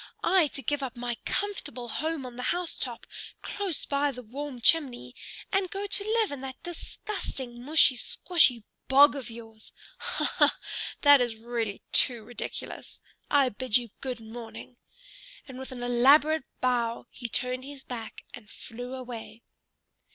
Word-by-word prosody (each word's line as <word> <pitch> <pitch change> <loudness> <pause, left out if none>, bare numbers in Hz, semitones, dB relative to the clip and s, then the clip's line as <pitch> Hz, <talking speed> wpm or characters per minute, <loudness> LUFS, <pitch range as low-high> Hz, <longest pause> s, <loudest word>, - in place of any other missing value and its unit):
I 365 -5 +5
to 275 - -5
give 290 +4 0
up 260 -2 -4
my 240 0 -2
comfortable 300 -11 -2
home 310 +3 -2
on 250 -1 -8
the 250 - -5
house 355 -1 -1
top, - - -3 0.4
close 390 -6 -3
by 285 +1 +1
the 250 -2 -7
warm 265 +3 -6
chimney, 245 - +3 0.4
and 385 -1 +1
go 395 +2 -3
to 400 0 +3
live 440 -1 +1
in 285 -2 -5
that 265 -1 -8
disgusting 280 - -5
mushy 290 -1 +5
squshy 255 - +3 0.2
bog 280 +2 +7
of 265 -5 -6
yours! 225 -1 -11 0.3
Ha - - -1
ha! - - +5 0.4
That 285 -2 +8
is 240 -2 0
really 225 -2 -3
too 240 -3 +5
ridiculous! 240 +2 -7 0.3
I 280 -3 +4
bid 250 0 +2
you 240 -3 -6
good 255 -3 -3
morning." 225 +2 -9 0.7
And 260 -2 -9
with 265 - -7
an 245 -1 -6
elaborate 275 +5 +5 0.2
bow 240 -2 0
he 240 -2 -5
turned 255 +2 -1
his 275 0 -9
back 230 -3 -7
and 225 -4 -11
flew 245 +4 -7
away. 235 -3 -8
255 Hz, 155 wpm, -28 LUFS, 240-290 Hz, 0.7 s, That